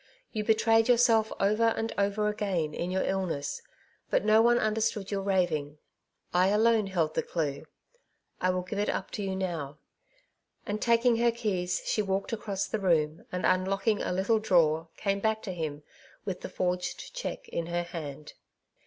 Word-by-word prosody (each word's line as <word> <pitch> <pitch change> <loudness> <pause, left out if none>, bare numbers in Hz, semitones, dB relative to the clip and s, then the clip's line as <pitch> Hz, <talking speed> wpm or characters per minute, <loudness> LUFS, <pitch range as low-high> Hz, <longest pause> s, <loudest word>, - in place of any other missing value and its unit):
You 215 -2 -2
betrayed 225 +1 +3
yourself 230 -2 +4
over 215 +3 +3
and 225 0 -2
over 200 +1 +1
again 195 -7 -1
in 175 - -3
your 190 +1 0
illness, 180 -7 -2 0.5
but - - +1
no 215 +1 +6
one 240 +1 +5
understood 215 -2 0
your 200 -1 -1
raving. 175 -7 0 0.6
I 180 +1 +4
alone 215 +1 +3
held 165 -5 0
the - - +1
clue. 145 -4 -3 0.7
I 185 - +2
will 180 0 0
give 200 +3 -4
it 205 - 0
up - - -3
to 210 - -4
you 190 -1 -2
now 165 -7 -3 0.5
;" - - -45
and 210 +1 -3
taking 235 0 +3
her 235 0 +3
keys 190 -6 -2
she 215 - +1
walked 195 +1 -2
across 200 -3 -2
the 220 - -3
room, 160 -5 +1
and 180 - -2
unlocking 195 +3 +1
a - - -2
little 195 +5 +2
drawer, 165 -6 +3
came 200 -1 0
back 220 +1 0
to 190 - -4
him 155 -4 -4 0.4
with 185 -3 -4
the - - -6
forged 180 - -3
cheque - - -5
in 170 - -3
her 175 0 -1
hand. 155 -4 -7
195 Hz, 175 wpm, -29 LUFS, 175-215 Hz, 0.7 s, no